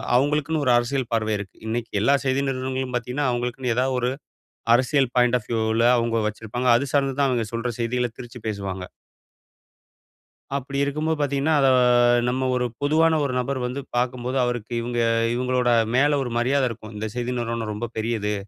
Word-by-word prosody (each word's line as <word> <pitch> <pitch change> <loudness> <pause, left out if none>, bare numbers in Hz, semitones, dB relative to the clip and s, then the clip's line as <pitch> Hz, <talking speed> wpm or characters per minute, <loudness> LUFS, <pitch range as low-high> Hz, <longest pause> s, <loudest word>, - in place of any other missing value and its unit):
அவுங்களுக்குன்னு 150 +3 +1
ஒரு 125 - +4
அரசியல் 120 +1 -1
பார்வை 110 -1 +1
இருக்கு. 100 -2 -8
இன்னைக்கு 115 0 -3
எல்லா 140 +5 +4
செய்தி 130 +1 +1
நிறுவனங்களும் 130 -1 -3
பாத்தீங்கன்னா, 125 +4 -2
அவுங்களுக்குன்னு 120 0 -2
எதா 125 +2 +2
ஒரு 125 0 0 0.7
அரசியல் 130 0 +2
பாய்ண்ட் 125 0 +4
ஆஃப் 105 - -18
வியூவ்ல 110 +1 +1
அவங்க 115 -1 0
வச்சிருப்பாங்க. 110 +4 -2
அது 140 - -2
சார்ந்துதான் 135 -1 +2
அவங்க 120 -3 0
சொல்ற 115 +1 -2
செய்திகள 125 +1 0
திரிச்சு 120 0 -9
பேசுவாங்க. 100 -3 -4 1.7
அப்டி 140 +1 -5
இருக்கும்போது 155 +3 -1
பாத்தீங்கன்னா, 140 +2 +1
அத 135 - +4 0.6
நம்ம 130 +1 0
ஒரு 125 0 0 0.2
பொதுவான 160 +2 +3
ஒரு 135 - -2
நபர் 130 +1 -2
வந்து 130 +3 -3
பாக்கும்போது, 125 +1 -1
அவருக்கு 120 -1 -3
இவுங்க 120 0 -3 0.4
இவுங்களோட 125 0 +1 0.3
மேல 145 +2 +3
ஒரு 120 - -5
மரியாத 130 +2 +2
இருக்கும். 110 -1 -9
இந்த 110 +1 -3
செய்தி 125 +1 -2
நிறுவனம் 115 -2 -3
ரொம்ப 115 +3 -4
பெரியது, 110 -2 -1
125 Hz, 160 wpm, -23 LUFS, 115-135 Hz, 1.7 s, ஒரு